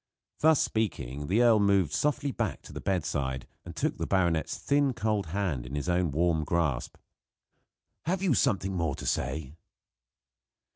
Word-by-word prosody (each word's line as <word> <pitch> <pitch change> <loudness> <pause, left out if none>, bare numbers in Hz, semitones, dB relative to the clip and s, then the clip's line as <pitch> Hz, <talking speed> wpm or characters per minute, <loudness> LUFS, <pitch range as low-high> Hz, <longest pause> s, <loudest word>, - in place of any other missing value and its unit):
Thus 160 -1 +5
speaking, 75 - -2
the 110 +7 +3
earl 115 -3 +6
moved 100 -6 +3
softly 145 -1 0
back - - -3
to - - -12
the - - -6
bedside 70 -8 -1 0.2
and - - -9
took - - -1
the - - -2
baronet's 85 -4 +1
thin, 140 -2 +2
cold 105 -4 -1
hand 85 -7 -2
in 65 +4 -7
his 75 +3 -3
own 90 -1 +2
warm 80 +2 +1
grasp. 75 -6 -1 1.1
"Have 185 +3 0
you 180 -7 +3
something 95 -8 +1
more 80 -5 0
to - - -8
say?" 75 -3 -2
90 Hz, 155 wpm, -29 LUFS, 75-110 Hz, 1.1 s, earl